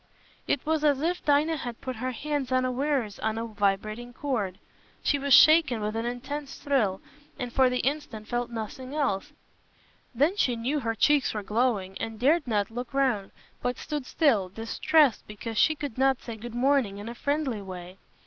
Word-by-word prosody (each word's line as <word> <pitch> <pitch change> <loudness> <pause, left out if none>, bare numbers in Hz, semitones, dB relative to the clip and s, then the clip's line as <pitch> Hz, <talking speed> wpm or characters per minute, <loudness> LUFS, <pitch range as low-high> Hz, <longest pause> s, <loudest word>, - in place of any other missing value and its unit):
It 275 - 0
was 315 0 +1
as 290 -3 +3
if 355 +2 -1
Dinah 300 +2 +3
had 240 -4 -6
put 255 -3 -5
her 255 +3 -2
hands 275 +1 -3
unawares 255 -3 0
on 220 0 -1
a 225 - -2
vibrating 215 +3 -1
chord. 220 -10 -2 0.5
She 285 - +2
was 280 0 -3
shaken 310 -3 +7
with 210 +1 -3
an 225 +1 -1
intense 270 +4 -5
thrill, 220 -10 0 0.4
and 245 -2 -5
for 260 -1 +5
the 250 0 0
instant 265 -6 -3
felt 240 0 -2
nothing 240 +4 -6
else; 260 -11 -1 0.8
then 295 - +3
she 250 -11 +2
knew 255 +6 -1
her 225 -3 -2
cheeks 290 0 +3
were 210 - -3
glowing, 210 -3 0
and 225 -1 -5
dared 295 +4 +3
not 210 -2 0
look 245 +3 -6
round, 250 -8 +1 0.3
but 245 0 -1
stood 295 -4 -4
still, 225 - +2
distressed 245 - +2
because 215 +1 -4
she 315 - +4
could 285 -5 -6
not 270 -1 +3
say 230 - -7
good 235 +2 -8
morning 255 -5 +2
in 205 +2 -7
a 235 - -5
friendly 280 -4 -1
way. 185 -1 -9
245 Hz, 180 wpm, -27 LUFS, 220-285 Hz, 0.8 s, shaken